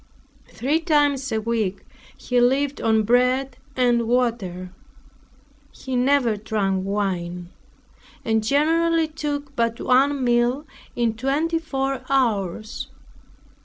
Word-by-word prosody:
Three 290 +6 -1
times 290 -5 +1
a 220 - 0
week 215 -4 -2 0.3
he 250 -1 0
lived 270 +3 +1
on 220 -1 +2
bread 250 +3 +2 0.2
and 240 -2 +2
water. 215 -7 -1 1.0
He 260 -1 -6
never 250 -2 +2
drank 200 -3 -1
wine, 180 -3 -3 0.7
and 220 -1 +1
generally 325 +5 +2
took 290 -2 -5
but 230 0 0
one 270 +2 +2
meal 240 +4 +1 0.3
in 235 -2 +1
twenty 290 +8 0
four 270 -4 -2
hours. 220 -5 -1
245 Hz, 105 wpm, -23 LUFS, 220-280 Hz, 1.0 s, on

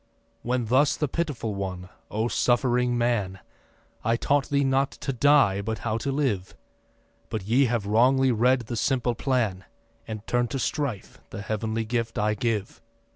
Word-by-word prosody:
When 125 0 -1
thus 135 +6 +3
the 150 - 0
Pitiful 140 -8 -2
One: 95 -2 -5 0.2
'O 110 +2 -1
suffering 120 0 +1
man, 110 -6 0 0.6
I 115 +1 +2
taught 140 +2 +1
thee 140 0 +2
not 135 0 +2
to 135 - -4
die, 125 -6 +4
but 110 +2 -3
how 110 0 0
to 140 - -2
live; 125 -10 -1 0.7
But 110 -3 -3
ye 125 +6 +3
have 120 -4 -1
wrongly 130 +5 +4
read 125 +3 +3
the 120 +1 -5
simple 125 0 +1
plan, 115 -7 -1 0.4
And 110 -1 -6
turn 120 0 +1
to 125 - -4
strife 135 - -3
the 100 - -7
Heav'nly 110 +2 -2
gift 115 0 -2
I 105 0 +1
give. 105 -1 -2
120 Hz, 160 wpm, -26 LUFS, 110-130 Hz, 0.7 s, die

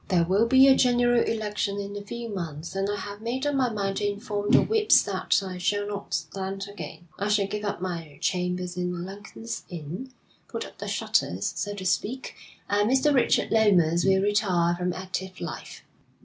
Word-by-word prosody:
There 180 -4 +3
will 200 +6 +3
be 265 +2 +7
a 270 - +8
general 245 -1 +4
election 210 -2 -2
in 200 0 -5
a 205 - -4
few 235 +3 -6
months, 170 -6 -5
and 195 +1 0
I 205 - 0
have 205 0 -7
made 250 +4 -2
up 290 - +1
my 260 -3 +2
mind 195 -2 -2
to - - -2
inform 205 -1 -3
the - - +6
whips 435 -1 +5
that - - +1
I 185 -1 -6
shall 205 +3 0
not 205 0 -4
stand 195 0 -4
again. 200 -3 -9
I 200 - 0
shall 205 -1 +3
give 210 +1 -4
up 205 -3 -3
my 165 -5 -5
chambers 180 -1 -1
in 180 -1 -3
Lincoln's 205 +4 -7
Inn, 175 - -6 0.4
put - - -4
up - - -14
the - - -5
shutters, - - 0
so 205 -1 -3
to 190 -2 -7
speak, 210 +8 -1 0.3
and 205 +1 +2
Mr. 265 +3 +3
Richard 260 - +2
Lomas 180 -7 +4
will 190 0 +3
retire 190 -5 +2
from 180 +1 -1
active 185 0 -5
life.' 170 - -7
200 Hz, 190 wpm, -26 LUFS, 180-220 Hz, 0.4 s, a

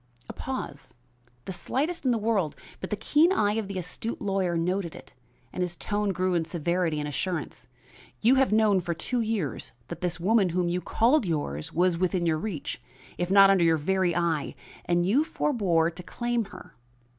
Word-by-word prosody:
A - - -7
pause, 255 - -6 0.5
the 190 - -4
slightest 295 - -2
in 255 - +4
the 235 - +2
world, 210 -8 0 0.2
but 185 - -5
the - - 0
keen 300 - +3
eye 210 - +2
of 220 -2 -2
the 195 -1 -5
astute 185 +6 -5
lawyer 195 -4 0
noted 180 0 -1
it, - - -13 0.4
and 185 - -3
his 180 -1 -2
tone 205 +2 -1
grew 185 0 0
in 170 -2 +2
severity 170 0 -1
and 150 - -3
assurance. 145 -4 -4 0.5
"You 235 +4 +5
have 270 -2 +3
known 215 -3 +4
for 170 -1 -3
two 240 +8 -1
years 210 - -2 0.2
that - - -7
this 175 -1 -2
woman 195 +1 +3
whom 175 0 0
you 180 +1 -1
called 235 +3 +2
yours 75 - -2
was 175 0 +2
within 185 -1 +1
your 160 -2 +1
reach, 165 - -5 0.4
if 175 0 -1
not 195 0 +7
under 190 -3 +4
your 165 -1 +4
very 180 +2 +1
eye, 170 -4 0 0.3
and 175 0 +2
you 240 +11 +3
forbore 195 - +1
to 175 +2 -9
claim 240 +4 -2
her. 205 - -12
185 Hz, 190 wpm, -27 LUFS, 170-215 Hz, 0.5 s, not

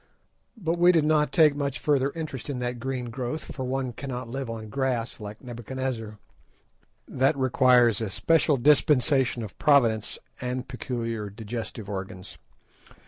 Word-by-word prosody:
But 170 -4 -1
we 175 +1 +7
did 165 -4 +3
not 150 -1 +3
take 155 -4 +5
much 140 -3 -2
further 140 +1 +1
interest 155 -5 -5
in 140 - -2
the 125 0 -2
green 125 0 -4
growth, 130 +5 -4
for 130 - -5
one 130 -1 -2
cannot 125 -1 -5
live 135 0 -4
on 110 -1 -6
grass 125 0 -2
like 105 +2 -9
Nebuchadnezzar. 120 -2 -5 0.9
That 135 +3 +1
requires 125 -4 +4
a 110 - -2
special 155 - +2
dispensation 135 -2 +3
of 105 - -8
Providence 115 -7 +3 0.2
and 125 0 -3
peculiar 115 -4 -4
digestive 110 0 -6
organs. 95 -2 -7
125 Hz, 140 wpm, -26 LUFS, 115-140 Hz, 0.9 s, we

